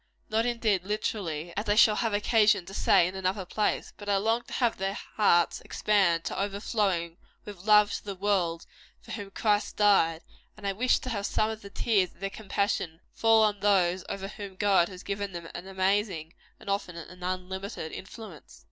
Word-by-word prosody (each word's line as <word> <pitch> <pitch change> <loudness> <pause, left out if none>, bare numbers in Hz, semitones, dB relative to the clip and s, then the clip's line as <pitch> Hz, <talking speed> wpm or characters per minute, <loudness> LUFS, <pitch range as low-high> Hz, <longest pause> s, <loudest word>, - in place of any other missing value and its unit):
Not, 225 +2 +2
indeed, 220 -6 +1
literally, 180 -5 -3
as 205 +1 -3
I 205 - +4
shall 215 -1 +6
have 225 - 0
occasion 210 -2 +3
to 190 - -10
say 175 - +4
in 180 - -5
another 190 0 -2
place. 210 +3 -1
But 205 -1 -7
I 200 - +3
long 225 +4 +1
to - - -10
have 240 -3 +1
their 195 +1 -2
hearts 175 -7 +1
expand 185 -6 +1
to - - -3
overflowing 195 -4 -1 0.3
with 200 -3 -10
love 210 -1 +6
to - - -4
the 200 -1 -5
world 185 -4 0 0.3
for - - -13
whom 205 -3 -6
Christ 205 0 0
died; 175 -6 +3 0.3
and 210 - -10
I 200 - 0
wish 250 +6 +2
to 255 - -6
have 205 -4 -2
some 215 +1 +1
of 220 0 -7
the 200 - -10
tears 200 -3 +1
of - - -26
their 195 0 -3
compassion 195 -5 -2
fall 225 -1 +4
on 210 -1 +1
those 190 -3 +2
over 195 0 -4
whom 200 -1 -8
God 190 -3 +3
has 185 -1 -10
given 200 -1 -4
them 170 -1 -7
an 175 +2 -7
amazing, 190 -3 0 0.3
and - - -16
often 200 -3 -2
an 180 +2 -10
unlimited 185 -1 -4
influence. 190 -4 -10
200 Hz, 190 wpm, -28 LUFS, 185-210 Hz, 0.3 s, shall